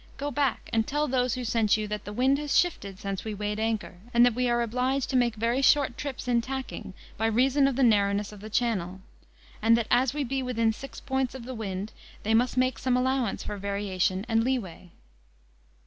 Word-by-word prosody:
go 290 +1 -3
back, 275 -3 0
and 225 -1 +2
tell 295 +2 0
those 250 -2 +1
who 250 -1 -4
sent 225 -2 +2
you, 215 -1 -3
that 210 -1 -5
the 205 - -6
wind 260 +5 +2
has 295 -1 0
shifted 200 - 0
since 195 0 -4
we 215 -1 -4
weighed 210 +1 -3
anchor, 220 -4 -2 0.2
and 240 +1 +7
that 245 - +3
we 250 +1 0
are 240 0 +2
obliged 255 +3 0
to - - -1
make 240 -3 +2
very 230 +4 0
short 275 -2 +4
trips 265 -2 -5
in 240 -1 +3
tacking, 235 -6 -6 0.2
by 225 - +1
reason 265 +5 +3
of 275 - -1
the 270 - +2
narrowness 205 -3 +2
of 210 - -11
the 215 - -8
channel; 190 -6 -1 0.6
and 230 +1 +5
that 235 - 0
as 245 0 +4
we 295 0 -2
be 270 +1 -2
within 230 -3 +1
six 275 +4 -9
points 265 -1 -2
of 250 -3 -8
the 260 - -6
wind, 200 -3 -5 0.3
they 220 - +1
must 245 +2 +2
make 255 0 +1
some 255 -1 +1
allowance 255 -3 0
for 210 - -5
variation 195 -1 -1
and 225 -1 +2
leeway." 205 -9 -3
235 Hz, 215 wpm, -27 LUFS, 210-260 Hz, 0.6 s, and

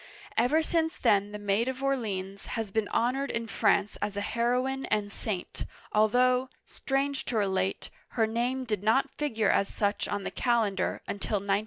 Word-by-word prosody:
Ever 270 +8 +3
since 320 0 0
then 205 0 +3
the 210 - -5
Maid 205 +3 +1
of 260 +1 -3
Orleans 200 -8 -2
has 220 -3 -3
been 220 0 0
honored 265 +4 0
in 230 0 -2
France 205 -2 +1
as 205 -1 -2
a - - 0
heroine 250 +5 0
and 205 -1 0
saint, 200 -3 -4 0.3
although, 250 +4 +3 0.2
strange 275 0 -1
to 240 - -1
relate, 190 -2 0 0.3
her 225 - +5
name 240 +4 -1
did 210 -5 -1
not 225 +6 +2
figure 225 -8 +1
as 195 - +2
such 205 -1 -1
on 205 -1 -2
the - - -3
calendar 220 -6 0
until 200 +2 -2
1909. 200 0 +1
220 Hz, 170 wpm, -29 LUFS, 205-255 Hz, 0.3 s, her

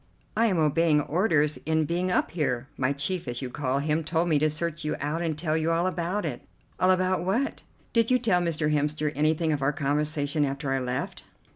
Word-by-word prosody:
"I 230 +1 +3
am 190 -5 +1
obeying 155 0 +3
orders 155 -2 +1
in 160 0 +1
being 175 +4 -1
up 180 - +1
here. 135 -6 -1
My 130 0 0
chief, 150 +4 -2
as 120 +2 -4
you 125 - -5
call 135 -1 -1
him, 150 +3 0
told 165 +2 0
me 150 -3 +3
to 155 +1 +3
search 165 +1 -3
you 150 - -1
out 150 +4 -2
and 160 -3 -1
tell 155 -1 0
you 160 0 +1
all 165 +1 +1
about 185 +2 -1
it." - - -4 0.4
"All 185 - +3
about 185 -1 +2
what?" 225 +10 -1 0.3
"Did 230 -1 +3
you 255 - +5
tell 210 -8 +2
Mr. 155 -3 0
Hemster 150 0 0
anything 155 +2 +1
of 145 - -2
our 135 +2 +2
conversation 145 +1 0
after 140 -1 -2
I 135 - +1
left?" 125 0 -3
155 Hz, 215 wpm, -27 LUFS, 145-175 Hz, 0.4 s, you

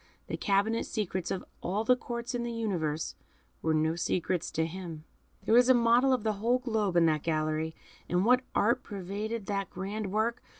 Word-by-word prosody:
The - - -4
cabinet 205 +3 +1
secrets 190 -4 -2
of 190 - -3 0.2
all 200 +5 -1
the 250 +3 +5
Courts 240 0 -5
in 245 - -1
the 235 0 -3
universe 175 -10 -2 0.5
were 160 -1 +1
no 160 +1 +2
secrets 175 0 -1
to 160 - 0
him. 165 -2 -7 0.4
There - - +1
was 245 +2 +6
a 260 - +8
model 240 +3 +4
of 255 -4 +1
the 220 -1 +1
whole 240 +3 +3
globe 220 -7 -1
in 170 - +6
that 155 -2 +2
gallery, 155 0 -1 0.3
and 180 +2 +2
what 250 +2 +5
art 235 +5 +3
pervaded 205 +2 -4
that 195 -2 -2
grand 195 +2 -4
work! 230 +4 0
205 Hz, 185 wpm, -30 LUFS, 170-235 Hz, 0.5 s, a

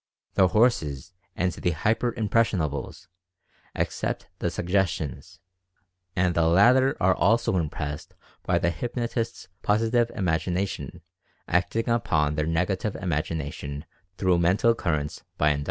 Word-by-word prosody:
The 95 - +5
"horses" 90 - +1 0.2
and 90 0 +1
the 90 - -1
"hyper 110 +9 +1
impressionables" 100 - -1 0.7
accept - - -2
the - - 0
suggestions, 85 -7 -2 0.8
and 90 -1 +2
the 85 -1 +2
latter 125 +10 +5
are 95 +1 +4
also 110 +2 +2
impressed 75 -2 -4 0.3
by - - +1
the 85 - +1
hypnotist's 115 +4 -3
Positive 115 +3 +2
Imagination 90 0 -2 0.5
acting 90 +7 0
upon 80 -11 +1
their 75 0 -1
Negative 90 +5 0
Imagination 75 -4 -3 0.3
through 90 -2 +2
Mental 95 +7 +3
Currents 75 -9 -2
by 75 - +3
Induction. 70 - -1
90 Hz, 115 wpm, -26 LUFS, 80-110 Hz, 0.8 s, The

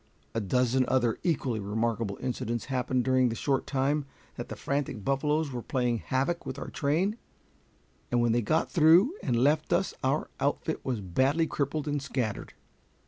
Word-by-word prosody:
A 115 - -1
dozen 125 +5 +2
other 120 -3 +1
equally 135 -9 0
remarkable 110 0 -1
incidents 120 -2 -2
happened 125 0 +1
during 130 -1 +3
the 115 - -3
short 135 +2 0
time 140 +2 0 0.3
that - - -6
the - - -5
frantic 140 -7 -3
buffaloes 150 +2 +1
were 125 -2 -4
playing 125 -3 0
havoc 140 +9 -1
with 130 - -6
our - - -6
train, 175 +10 0 0.9
and 120 - +2
when 120 -1 +3
they 120 +1 +2
got 155 +9 0
through 170 - +6
and 125 - 0
left 145 +6 +2
us - - +1
our - - 0
outfit - - -1
was 125 -5 -2
badly 130 - +2
crippled 150 0 -2
and 145 -1 -1
scattered. 125 -6 -3
130 Hz, 165 wpm, -29 LUFS, 120-145 Hz, 0.9 s, through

